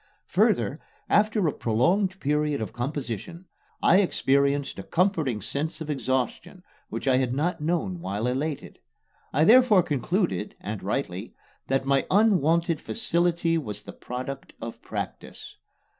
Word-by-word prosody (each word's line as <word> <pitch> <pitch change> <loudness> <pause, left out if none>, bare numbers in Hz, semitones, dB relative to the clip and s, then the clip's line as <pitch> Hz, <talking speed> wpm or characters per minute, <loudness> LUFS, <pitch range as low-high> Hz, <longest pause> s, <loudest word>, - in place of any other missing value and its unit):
Further, - - +2 0.3
after 210 -3 +3
a 150 - 0
prolonged 185 - +1
period 150 0 0
of 110 -3 -4
composition, 135 - -4 0.4
I 175 - +6
experienced 140 -6 +1
a - - -3
comforting 160 - 0
sense 155 +7 -3
of 155 -1 -4
exhaustion 130 - -2 0.3
which - - -5
I 130 -1 +4
had 130 -1 0
not 160 +3 -1
known 175 +3 -1
while 105 - -3
elated. 135 +4 -3 0.5
I 150 - +3
therefore 220 -1 +6
concluded 155 - -1
and - - -5
rightly - - -3 0.3
that 135 0 0
my 135 0 +2
unwonted 170 -5 +3
facility 170 -5 +1
was 105 -9 -6
the - - -9
product 130 +2 -6
of 115 - -7
practice. - - -7
150 Hz, 130 wpm, -26 LUFS, 130-175 Hz, 0.5 s, I